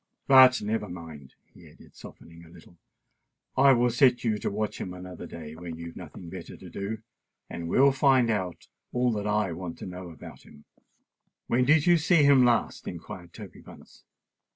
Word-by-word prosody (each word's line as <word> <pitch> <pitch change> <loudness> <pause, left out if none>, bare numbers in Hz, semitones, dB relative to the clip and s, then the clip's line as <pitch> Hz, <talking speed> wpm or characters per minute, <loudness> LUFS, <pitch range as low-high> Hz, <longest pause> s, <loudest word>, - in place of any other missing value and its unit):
"But 130 -3 +7
never 105 -1 -2
mind," 80 -6 -10 0.2
he - - -16
added, - - -19
softening 85 0 -14
a 80 - -16
little: 85 0 -18 0.8
"I 135 +1 +6
will 120 0 +2
set 125 0 +3
you 110 -3 0
to - - -2
watch 105 +1 -4
him 90 -1 -6
another 90 -1 -9
day 80 -2 -9
when 85 0 -8
you've 85 0 -9
nothing 90 - -10
better 85 0 -9
to 95 - -12
do, 105 +4 -5 0.5
and 85 -1 -6
we - - +1
will 140 +1 +6
find 135 -3 +3
out 95 -5 -4 0.2
all 125 -2 0
I 105 -3 0
want 85 0 -7
to - - -8
know 90 -1 -8
about 80 - -12
him." 75 - -18 0.8
"When 125 +1 +1
did 155 +2 +4
you 175 -1 +5
see 160 -1 +3
him 140 -2 +6
last?" 120 -2 0
inquired 90 -2 -8
Toby - - -11
Bunce. - - -16
105 Hz, 180 wpm, -27 LUFS, 85-125 Hz, 0.8 s, But